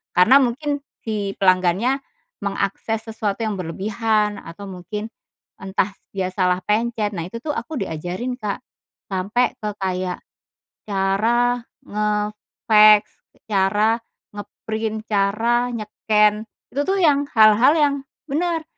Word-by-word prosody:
karena 220 +10 +7
mungkin 285 +4 -1 0.2
si 205 -3 -3
pelanggannya, 185 +8 +3 0.4
mengakses 200 +3 -2
sesuatu 215 -1 -2
yang 215 -3 -2
berlebihan, 210 +4 0
atau 170 +5 -10
mungkin 210 +4 -6 0.5
entah 190 +1 -1 0.2
dia 190 -2 -1
salah 185 -1 +1
pencet, 215 +1 0
nah 165 -2 -3
itu 230 +6 -7
tuh 310 - -1
aku 265 +3 -4
diajarin 185 +10 -4
Kak, 210 -3 -3 0.5
sampai 200 +7 +1
ke 210 - -2
kayak, 185 -1 -2 0.7
cara 225 +5 +2 0.3
nge-fax, 210 0 +3 0.5
cara 210 +3 +3 0.4
nge-print, 220 +1 -4
cara 225 +4 +1
nye-scan 210 -1 +1 0.3
itu 280 - -1
tuh 390 +1 +1
yang 290 -3 +4
hal-hal 220 +5 +7
yang 295 -3 +3 0.4
bener, 330 +2 0
210 Hz, 110 wpm, -21 LUFS, 195-235 Hz, 0.7 s, karena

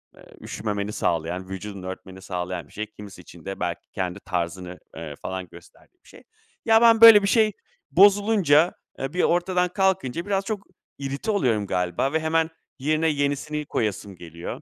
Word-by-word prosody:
eee, - - -17 0.2
üşümemeni 105 -1 -4
sağlayan, 85 0 -2
vücudunu 95 0 -7
örtmeni 95 0 -9
sağlayan 90 -3 -5
bir - - -21
şey. 105 - -4
Kimisi 100 -3 -11
için 85 -1 -15
de 95 0 -6
belki 90 -1 -4
kendi 95 -1 -3
tarzını, 90 -1 -4 0.2
ııı, 80 -3 -7
falan 95 +4 -6
gösterdiği 85 - -18
bir - - -20
şey. - - -16 0.4
Ya, 225 0 +5
ben, 230 -1 +6
böyle, 225 -3 +10
bir - - +1
şey 215 0 +3 0.4
bozulunca, 195 -5 +5 0.3
eee, 135 +1 -4
bir 180 - +1
ortadan 180 +1 +1
kalkınca 180 -5 0
biraz 195 -1 -1
çok 210 -2 -4 0.3
irite 140 +10 -3
oluyorum 115 - +1
galiba 90 - -1
ve 160 - +2
hemen 160 0 +1 0.3
yerine 155 +4 +1
yenisini 145 +1 -2
koyasım 105 -5 -3
geliyor. 85 -1 -8
115 Hz, 165 wpm, -24 LUFS, -, 0.4 s, böyle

